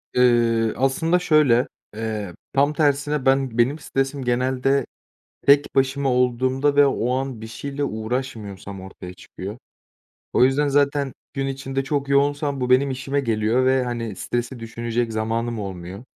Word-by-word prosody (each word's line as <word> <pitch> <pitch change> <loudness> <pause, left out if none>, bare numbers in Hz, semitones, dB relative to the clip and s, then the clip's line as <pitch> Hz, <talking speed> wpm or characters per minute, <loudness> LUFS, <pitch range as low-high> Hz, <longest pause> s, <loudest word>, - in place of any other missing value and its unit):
Iıı, 115 -2 +3
aslında 160 +7 +2
şöyle, 150 -8 +4 0.3
eee, 110 -4 -4 0.2
tam 140 +2 +3
tersine 145 -1 +1
ben 135 -3 +2
benim 130 +6 +2
stresim 135 -1 -2
genelde 130 +2 +1 0.6
tek 140 +1 +5
başıma 135 0 +1
olduğumda 130 +3 +1
ve 145 0 +7
o 125 -2 0
an 130 -3 -4
bir 110 - -7
şeyle 140 +5 -4
uğraşmıyorsam 110 -5 -4
ortaya 95 -1 -10
çıkıyor. 95 +4 -9 0.7
O - - +5
yüzden 140 +3 +2
zaten 140 -1 +1 0.2
gün 135 -1 -1
içinde 135 0 -3
çok 140 0 -2
yoğunsam 140 0 +1
bu 125 0 -1
benim 135 +2 +4
işime 135 +2 -1
geliyor 115 0 +1
ve, 130 0 +3
hani, 115 -4 -4
stresi 120 +5 -3
düşünecek 115 0 -3
zamanım 115 +1 -2
olmuyor. 95 +1 -7
130 Hz, 140 wpm, -22 LUFS, 115-140 Hz, 0.7 s, ve